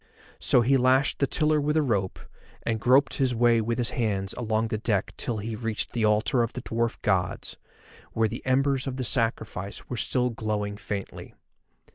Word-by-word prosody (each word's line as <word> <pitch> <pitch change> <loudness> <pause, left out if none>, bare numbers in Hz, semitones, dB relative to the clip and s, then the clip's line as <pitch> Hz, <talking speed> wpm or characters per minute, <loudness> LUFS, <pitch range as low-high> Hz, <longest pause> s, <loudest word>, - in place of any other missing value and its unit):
So 125 - +4
he 135 +3 +3
lashed 130 +3 +2
the 140 - +2
tiller 150 +1 +2
with 150 +2 0
a 155 - +3
rope, 100 -8 -1 0.5
and 115 -1 -1
groped 130 +5 +4
his 130 -3 +1
way 120 0 +4
with 115 +1 -2
his 120 -2 0
hands 100 -5 -1
along 110 -1 -1
the 110 -2 -2
deck 105 -4 -1
till 115 - -2
he 110 +2 -4
reached 115 -1 -2
the 115 -3 +1
altar 105 +4 +2
of 115 0 -1
the 125 - -5
dwarf 115 +1 -1
gods, 95 -3 -1 0.6
where 115 0 +2
the 115 +3 -6
embers 135 +1 +1
of 130 -1 -3
the 130 - -2
sacrifice 110 -5 -1
still 125 +2 +1
were - - -7
glowing 105 -2 -2
faintly. 100 -1 -6
115 Hz, 185 wpm, -26 LUFS, 110-130 Hz, 0.6 s, So